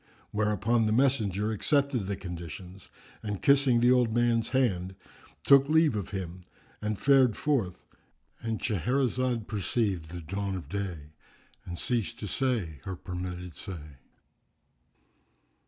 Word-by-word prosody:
Thereupon 110 Hz, +2 st, +2 dB
the -, -, +1 dB
messenger 110 Hz, -5 st, +2 dB
accepted 135 Hz, -1 st, +1 dB
the 100 Hz, -, -1 dB
conditions 90 Hz, 0 st, -8 dB, 0.3 s
and 105 Hz, -3 st, -4 dB
kissing 140 Hz, -3 st, +4 dB
the 120 Hz, +1 st, +5 dB
old 125 Hz, -3 st, +4 dB
man's 120 Hz, -1 st, +2 dB
hand, 95 Hz, -8 st, 0 dB, 0.5 s
took 140 Hz, 0 st, +6 dB
leave 160 Hz, -5 st, +4 dB
of 100 Hz, -4 st, -3 dB
him, 90 Hz, -3 st, -5 dB, 0.4 s
and 105 Hz, -1 st, -1 dB
fared 130 Hz, -4 st, +4 dB
forth.——And 115 Hz, -2 st, -4 dB
Shahrazad 125 Hz, -, 0 dB
perceived 100 Hz, -5 st, -1 dB
the 85 Hz, +1 st, -7 dB
dawn 95 Hz, +4 st, -3 dB
of 90 Hz, -, -7 dB
day 90 Hz, -7 st, -4 dB, 0.5 s
and 85 Hz, -1 st, -6 dB
ceased 120 Hz, 0 st, -1 dB
to 105 Hz, -, -5 dB
say 110 Hz, -, -1 dB
her 95 Hz, -, -4 dB
permitted 90 Hz, -1 st, -6 dB
say. 75 Hz, -7 st, -8 dB
105 Hz, 125 wpm, -29 LUFS, 90-125 Hz, 0.5 s, took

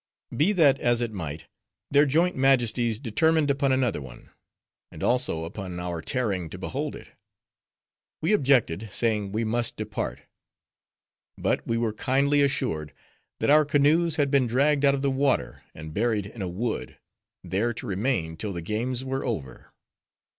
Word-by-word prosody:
Be 160 Hz, +8 st, +3 dB
that 145 Hz, -7 st, +4 dB
as 120 Hz, -1 st, +2 dB
it 120 Hz, -2 st, -2 dB
might, 80 Hz, -5 st, -6 dB, 0.5 s
their 145 Hz, +1 st, +5 dB
joint 170 Hz, +6 st, +2 dB
majesties 120 Hz, -4 st, +2 dB
determined 145 Hz, +5 st, +2 dB
upon 140 Hz, -1 st, +1 dB
another 130 Hz, -, +1 dB
one; 65 Hz, -3 st, -12 dB, 0.6 s
and -, -, -8 dB
also 125 Hz, -10 st, +1 dB
upon 90 Hz, +1 st, -6 dB
our 90 Hz, -2 st, -4 dB
tarrying 100 Hz, -9 st, -1 dB
to -, -, -7 dB
behold -, -, -4 dB
it. -, -, -12 dB, 1.1 s
We 165 Hz, +7 st, +1 dB
objected, 120 Hz, -, +2 dB
saying 105 Hz, -2 st, 0 dB
we 110 Hz, +3 st, -1 dB
must 115 Hz, +1 st, -1 dB
depart. 110 Hz, 0 st, -4 dB, 1.2 s
But -, -, -1 dB
we 115 Hz, -, 0 dB
were 115 Hz, -2 st, 0 dB
kindly 140 Hz, +5 st, +2 dB
assured, 80 Hz, -, -1 dB, 0.5 s
that -, -, +2 dB
our 155 Hz, +1 st, +7 dB
canoes 150 Hz, +3 st, +3 dB
had 145 Hz, -4 st, +1 dB
been 135 Hz, -3 st, +3 dB
dragged 140 Hz, +4 st, +2 dB
out 140 Hz, -1 st, +5 dB
of 135 Hz, -, -4 dB
the 140 Hz, -, +2 dB
water, 135 Hz, 0 st, 0 dB
and 80 Hz, 0 st, -8 dB
buried 110 Hz, -1 st, 0 dB
in 105 Hz, +1 st, -9 dB
a 95 Hz, -, -2 dB
wood; 110 Hz, +6 st, -4 dB, 0.5 s
there 105 Hz, +6 st, 0 dB
to 120 Hz, -, -7 dB
remain 95 Hz, -5 st, -1 dB
till 105 Hz, +2 st, -3 dB
the 85 Hz, -2 st, -5 dB
games 120 Hz, +7 st, -2 dB
were 135 Hz, 0 st, -2 dB
over. 90 Hz, -, -5 dB
120 Hz, 160 wpm, -26 LUFS, 100-140 Hz, 1.2 s, our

